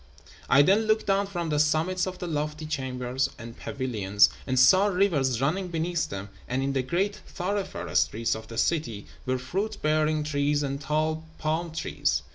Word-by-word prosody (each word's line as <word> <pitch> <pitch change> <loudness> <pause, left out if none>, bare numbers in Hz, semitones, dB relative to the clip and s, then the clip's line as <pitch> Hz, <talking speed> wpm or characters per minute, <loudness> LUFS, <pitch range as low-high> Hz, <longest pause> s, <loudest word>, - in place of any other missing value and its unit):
I 140 +3 +7
then 210 +7 +3
looked 215 0 +2
down 200 0 +2
from 175 -4 -3
the 150 -1 +1
summits 165 +5 +2
of 185 -1 -5
the 180 - -5
lofty 150 -1 -3
chambers 130 -2 -2
and 115 0 -9
pavilions, 105 -7 +2 0.2
and 130 -1 0
saw 190 +10 +6
rivers 165 - +2
running 180 +7 0
beneath 170 0 -1
them; 100 +1 -6 0.2
and 130 +2 -1
in 135 0 0
the 135 - +1
great 185 +10 -1
thoroughfare 195 +1 -3
streets 115 +2 +2
of 110 0 -7
the 115 - -8
city 115 -10 0 0.2
were 130 0 +1
fruit 195 +12 -3
bearing 155 0 +2
trees 145 0 +1
and 140 0 -3
tall 155 +2 -1
palm 160 +2 -1
trees. 75 - -1
150 Hz, 175 wpm, -27 LUFS, 130-180 Hz, 0.2 s, I